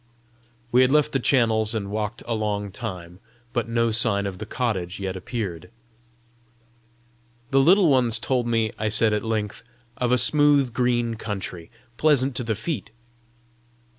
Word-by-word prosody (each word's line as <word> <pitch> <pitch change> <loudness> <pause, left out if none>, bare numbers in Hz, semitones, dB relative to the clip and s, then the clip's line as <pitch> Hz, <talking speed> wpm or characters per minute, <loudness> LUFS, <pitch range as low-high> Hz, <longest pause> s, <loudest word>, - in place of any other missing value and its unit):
We 125 - +5
had 130 0 +4
left 150 0 +3
the 135 - 0
channels 115 -4 +2
and 100 -2 -4
walked 105 +1 -4
a 120 - -2
long 105 -2 -2
time, 90 -6 -7 0.3
but 120 -2 -2
no 115 0 +1
sign 110 -3 +1
of 95 -2 -5
the 110 - -6
cottage 100 -8 -3
yet 95 -1 -4
appeared. 95 -4 -5 1.8
"The 135 - +4
Little 180 +6 +5
Ones 125 -5 +3
told 125 +1 -1
me," 115 -2 +1
I 110 0 0
said 110 +1 +4
at 105 - -1
length, 110 -2 -3 0.4
"of 125 -1 0
a 125 - +4
smooth 140 0 +3
green 120 -2 0
country, 95 -6 -6 0.3
pleasant 140 -4 +2
to 125 - -2
the 115 -2 -1
feet!" 130 +4 -4
115 Hz, 155 wpm, -24 LUFS, 105-125 Hz, 1.8 s, We